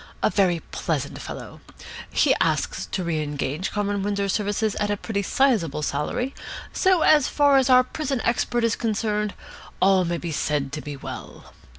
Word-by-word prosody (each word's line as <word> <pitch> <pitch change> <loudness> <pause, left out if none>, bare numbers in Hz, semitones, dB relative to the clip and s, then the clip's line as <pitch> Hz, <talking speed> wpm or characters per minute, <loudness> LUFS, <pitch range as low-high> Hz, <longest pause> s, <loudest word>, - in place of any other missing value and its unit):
A - - +3
very 180 -5 +2
pleasant - - -2
fellow. - - -8 0.5
He - - +4
asks - - 0
to 185 - -3
re 165 -2 -1
engage 150 +3 -3
Comrade 205 -1 -1
Windsor's 200 -1 0
services 210 0 0
at 205 - 0
a 205 - 0
pretty 200 -1 -2
sizeable 200 - +1
salary, 200 - -2 0.4
so, 375 -4 +3
as 300 -3 +5
far 285 -2 +4
as 265 0 +3
our 255 0 +7
prison 270 0 -3
expert 240 0 0
is 230 -1 +2
concerned, 210 -2 -1 0.4
all 190 -1 +4
may 170 0 -1
be 170 -1 -5
said 145 -2 -1
to 150 +1 -4
be 145 -1 -7
well. - - -9
205 Hz, 170 wpm, -24 LUFS, 170-240 Hz, 0.5 s, our